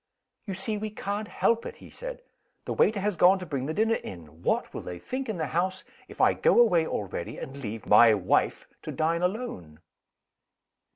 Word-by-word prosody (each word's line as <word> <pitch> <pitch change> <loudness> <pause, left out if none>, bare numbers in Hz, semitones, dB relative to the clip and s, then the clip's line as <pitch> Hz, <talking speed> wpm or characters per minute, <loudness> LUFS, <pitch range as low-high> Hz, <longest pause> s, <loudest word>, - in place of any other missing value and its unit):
"You 195 - -3
see 210 +3 -2
we 215 +1 -3
can't 205 0 -4
help 230 +2 +1
it," - - -7
he - - -14
said. - - -7 0.4
"The - - -2
waiter 210 -1 +3
has 205 -1 0
gone 180 +4 +6
to 185 - -7
bring 140 -4 -3
the 155 - -2
dinner 225 +1 +2
in. 80 -3 -10
What - - 0
will - - -5
they 90 - -7
think 260 - -5
in 215 - -2
the 160 - -1
house, 185 +4 -1 0.2
if - - -13
I - - +5
go 485 - +3
away 175 -9 +5
already, 95 -4 -4
and 135 +1 -7
leave 115 -4 -6
'my 110 +1 +7
wife' 95 -2 +1
to - - -6
dine 165 +2 0
alone?" 180 - -3
180 Hz, 195 wpm, -27 LUFS, -, 0.4 s, my